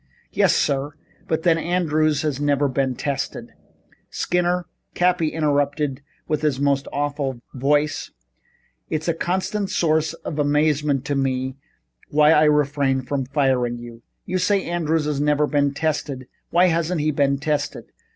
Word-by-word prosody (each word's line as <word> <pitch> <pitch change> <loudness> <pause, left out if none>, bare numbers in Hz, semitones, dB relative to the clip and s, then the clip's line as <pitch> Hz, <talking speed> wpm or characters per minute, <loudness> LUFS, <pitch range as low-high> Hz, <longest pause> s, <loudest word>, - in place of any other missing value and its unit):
"Yes - - +3
sir, 140 +1 0 0.3
but 160 0 -1
then 165 -2 +3
Andrews 155 -4 +1
has 145 -2 -2
never 145 -1 +2
been 130 -1 -1
tested 140 +1 -4 0.3
" - - -35
"Skinner," 180 0 +1 0.3
Cappy 175 -2 +2
interrupted 145 -2 0 0.3
in 155 - 0
his 145 -4 0
most 140 -1 +1
awful 145 -3 -2
voice, 145 +3 0 0.8
"it's 155 +1 -2
a 170 - +2
constant 190 +4 -2
source 160 -2 +1
of 150 - -6
amazement 145 -1 +1
to 145 - -1
me 130 -1 -1 0.5
why 150 +1 +5
I 155 -1 +5
refrain 145 -3 +2
from 135 0 -2
firing 130 -4 +1
you. 120 -1 -10 0.2
You 185 +1 -1
say 195 +2 +2
Andrews 165 -2 0
has 150 -2 -1
never 150 0 +2
been 145 -1 +1
tested. 145 -3 -2 0.2
Why 175 +2 +4
hasn't 165 0 0
he 155 +1 +1
been 140 -1 +1
tested? 145 +1 -3
150 Hz, 145 wpm, -22 LUFS, 140-160 Hz, 0.8 s, why